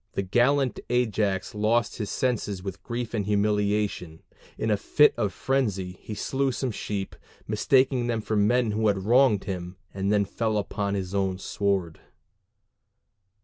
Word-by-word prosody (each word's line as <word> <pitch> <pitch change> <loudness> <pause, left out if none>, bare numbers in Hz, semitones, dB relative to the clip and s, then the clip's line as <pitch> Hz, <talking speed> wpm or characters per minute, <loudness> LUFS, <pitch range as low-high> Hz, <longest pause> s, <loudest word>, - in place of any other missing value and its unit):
The 100 - -1
gallant 125 +7 +2
Ajax 110 -6 0
lost 110 +3 +1
his 105 -3 -3
senses 105 -7 -1
with 95 - -6
grief 120 -1 -4
and 105 -4 -1
humiliation: 105 -5 0 0.3
in 110 - -1
a - - +4
fit 150 +8 +4
of 105 -4 -1
frenzy 100 -7 -1
he 105 - -7
slew 135 +5 0
some 130 0 -2
sheep, 100 -2 -4 0.3
mistaking 130 +3 +2
them 115 -2 0
for 110 - -2
the 105 - +3
men 120 +2 +2
who 110 +1 +1
had 100 -2 +1
wronged 120 -3 +4
him, 90 -1 -5 0.2
and 95 +1 -1
then 105 -1 +3
fell 110 +2 -1
upon 100 0 -2
his 95 -1 -4
own 95 -2 0
sword. 95 -4 -1
105 Hz, 155 wpm, -26 LUFS, 100-120 Hz, 0.3 s, a